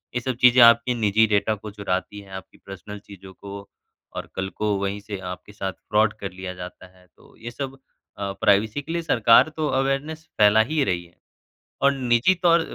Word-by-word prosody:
ये - - +1
सब 130 0 -3
चीज़ें 125 0 +7
आपकी 115 +1 +5
निजी 110 -1 +2
डेटा 105 +1 +1
को 105 +1 -10
चुराती 100 0 -4
हैं, 100 -1 -14
आपकी 95 0 -10
पर्सनल 100 +2 -9
चीज़ों 95 -2 -14
को 100 +1 -10 0.5
और - - -5
कल 95 0 -3
को 105 -1 0
वहीं 100 +1 -3
से 100 0 -7 0.2
आपके 90 +3 -14
साथ 95 -2 -4 0.2
फ्रॉड 110 0 +3
कर 100 -2 -5
लिया 90 0 -7
जाता 90 0 -10
है। 90 - -22
तो - - -23
ये 120 +1 -8
सब 135 +1 -6 0.4
अ, 100 -1 -3
प्राइवेसी 105 +5 +2
के 155 - -8
लिए 170 0 -1
सरकार 115 -2 +4
तो 155 -1 0
अवेयरनेस 135 +4 -1 0.2
फैला 105 +1 +6
ही 155 -2 +2
रही 90 -6 -1
है 85 - -23 0.7
और 140 0 +5
निजी 125 +5 +2
तौर 170 -1 +5
105 Hz, 200 wpm, -23 LUFS, 100-125 Hz, 0.7 s, चीज़ें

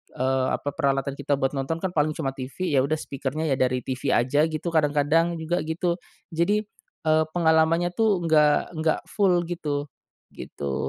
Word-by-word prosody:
eee, 130 0 +1
apa 145 - -4
peralatan 135 0 0
kita 145 0 0
buat 135 -1 +1
nonton 135 +4 -2
kan 190 -2 -2
paling 155 0 +1
cuma 135 -4 -2
TV 140 +7 -4
ya 130 - +5
udah 155 - 0
speaker-nya 140 +3 -4
ya 135 - +2
dari 125 0 +1
TV 130 0 -3
aja 140 +6 +3
gitu 155 +2 -3
kadang-kadang 155 +3 +2
juga 175 +3 -1
gitu, 170 +2 -1 0.3
jadi, 200 +6 +1 0.4
eee, 155 0 +4
pengalamannya 165 +1 +3
tuh 210 -6 +2
nggak 155 +1 +3
nggak 160 0 +1
full 180 -4 +2
gitu. 150 -5 -3 0.5
Gitu. 70 -1 -6
155 Hz, 165 wpm, -25 LUFS, 135-170 Hz, 0.5 s, ya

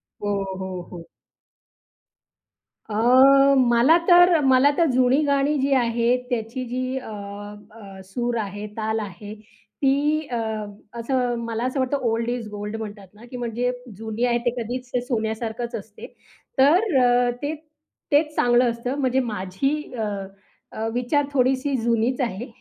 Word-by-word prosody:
हो, 200 -1 -4
हो, 185 -1 -5
हो. 170 -2 -8 1.9
अ, 265 +5 +5
मला 250 +5 +5
तर 355 -1 +7
मला 265 +2 +5
तर 335 - +4
जुनी 255 +3 +3
गाणी 280 +1 +1
जी 275 +1 0
आहे 235 0 +2
त्याची 240 +2 -3
जी 255 +1 -3
अ, - - -10 0.6
अ, 200 -3 -12
सूर 240 +5 -3
आहे, 205 0 -5
ताल 220 0 -1
आहे, 205 +1 -8
ती 280 +7 -2
अ, 245 - -3 0.6
असं, 245 -1 0
मला 230 0 -3
असं 255 +2 -1
वाटतं, 260 +2 0
ओल्ड 230 +1 -1
इज 240 -3 -4
गोल्ड 210 +1 -5
म्हणतात 205 -3 -8
ना, 215 +3 -15
की 250 - -6
म्हणजे 245 +1 -2 0.3
जुनी 220 +2 -3
आहे 240 -1 +2
ते - - +4
कधीच 245 +2 -6 0.2
सोन्यासारखंच 225 0 -3
असते, 210 -1 -8 0.5
तर 320 +5 +4
अ, 245 0 +3
ते 295 +2 -2 0.6
तेच 300 +1 +3
चांगलं 245 0 +3
असतं. 235 +3 -4
म्हणजे 260 0 +2
माझी 260 +11 -2
अ, 225 - -3 0.7
अ, 220 +1 -3
विचार 250 +4 +1
थोडीशी 265 +1 +1
जुनीच 235 +3 +1
आहे 235 -1 -2
245 Hz, 140 wpm, -23 LUFS, 220-265 Hz, 1.9 s, तर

